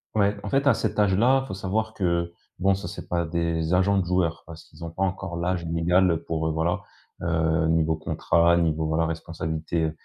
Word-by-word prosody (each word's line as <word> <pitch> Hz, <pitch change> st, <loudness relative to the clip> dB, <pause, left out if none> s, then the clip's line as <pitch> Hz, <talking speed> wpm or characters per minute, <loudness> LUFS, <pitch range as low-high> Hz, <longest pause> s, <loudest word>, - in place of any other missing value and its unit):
Ouais. 100 Hz, 0 st, +3 dB
En -, -, -4 dB
fait 140 Hz, +1 st, +1 dB
à -, -, +6 dB
cet -, -, -2 dB
âge-là, 115 Hz, +7 st, +4 dB
il -, -, -10 dB
faut -, -, -6 dB
savoir 110 Hz, +3 st, -2 dB
que, 85 Hz, -2 st, 0 dB, 0.3 s
bon, 95 Hz, +1 st, +3 dB
ça 95 Hz, -3 st, -6 dB
c'est 95 Hz, -, -8 dB
pas 85 Hz, -1 st, 0 dB
des 85 Hz, 0 st, -1 dB
agents 95 Hz, +2 st, +3 dB
de 95 Hz, -, +1 dB
joueurs 85 Hz, -2 st, 0 dB
parce 80 Hz, 0 st, -11 dB
qu'ils 85 Hz, -, -14 dB
ont 80 Hz, -, -6 dB
pas 95 Hz, -, -7 dB
encore 95 Hz, -2 st, -2 dB
l'âge 85 Hz, 0 st, -1 dB
légal 85 Hz, +1 st, +2 dB
pour, 80 Hz, -1 st, -1 dB
heu, -, -, 0 dB
voilà, 80 Hz, +2 st, 0 dB, 0.4 s
heu, 80 Hz, -1 st, +1 dB
niveau 80 Hz, -1 st, +2 dB
contrat, 85 Hz, +2 st, +2 dB
niveau, 80 Hz, -2 st, +1 dB
voilà 80 Hz, +1 st, +1 dB
responsabilité, 80 Hz, 0 st, -2 dB
85 Hz, 205 wpm, -25 LUFS, 80-95 Hz, 0.4 s, à